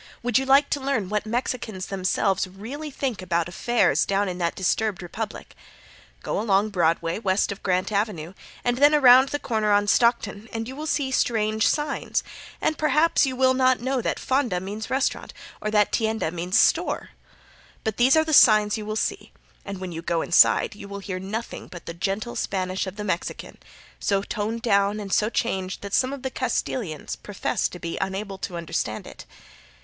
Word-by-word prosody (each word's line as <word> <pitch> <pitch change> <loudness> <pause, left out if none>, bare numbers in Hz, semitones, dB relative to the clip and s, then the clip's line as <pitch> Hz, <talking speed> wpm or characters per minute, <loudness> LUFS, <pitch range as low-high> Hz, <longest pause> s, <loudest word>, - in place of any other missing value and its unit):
Would 245 0 +3
you 265 - -3
like 275 +2 +5
to 285 - +1
learn 265 -8 -1
what 210 0 -1
the - - -7
Mexicans 225 -5 -3
themselves 190 0 0
really 235 +12 -7
think 260 -7 -3
about 170 -2 0
affairs 240 +7 +2
down 200 +1 0
in 180 -1 -4
that 170 -1 -1
disturbed 190 0 0
republic? 215 +5 -6 0.7
Go - - -2
along 205 -1 +2
Broadway 170 -2 0
west 195 -2 +1
of 200 - -7
Grant 185 +2 0
avenue, 200 -5 -2 0.3
and 245 0 +1
then 290 +2 +6
around 260 -1 +7
the 290 - -1
corner 220 -6 -1
on 205 0 +4
Stockton, 220 -1 +1
and 225 0 -4
you 260 - -7
will 305 +2 -5
see 280 -4 0
strange 220 -4 +1
signs, 295 -2 -1 0.4
and 310 - -1
perhaps 305 -1 +3
you 260 - -3
will 260 0 +4
not 255 0 +3
know 260 +1 -1
that - - -1
"Fonda" 255 -9 0
means 205 +4 -6
restaurant, 265 +1 -1 0.3
or 215 - -2
that 210 -1 +3
"Tienda," 220 -6 0
means 180 +2 -3
a - - +7
store. - - +2 0.7
But 220 -2 -2
these 255 +4 +5
are 315 - +4
the 315 - -2
signs 215 -4 +6
you 210 - -7
will 215 - -3
see, 395 - -2 0.3
and 200 -2 -6
when 185 -1 -5
you 165 0 -5
go 170 -1 -1
inside 175 - +4
you 205 -1 -10
will 200 0 -6
hear 195 -2 -5
nothing 215 +5 -5
but 175 - -11
the 165 - -6
gentle 195 +6 -3
Spanish 185 0 -2
of 190 - -6
the 210 - -5
Mexican, 185 -4 -4 0.4
so 200 -1 0
toned 220 +2 -3
down 200 -1 +2
and 200 -2 -5
so 215 - +3
changed 190 -6 -2
that 200 -1 -7
some 260 0 +2
of 280 -2 -7
the 265 - -3
Castilians 220 - -3
profess 205 -2 -2
to - - -9
be 170 -1 -5
unable 195 0 -4
to 175 -2 -5
understand 165 -10 -3
it. - - -12
210 Hz, 195 wpm, -24 LUFS, 190-245 Hz, 0.7 s, around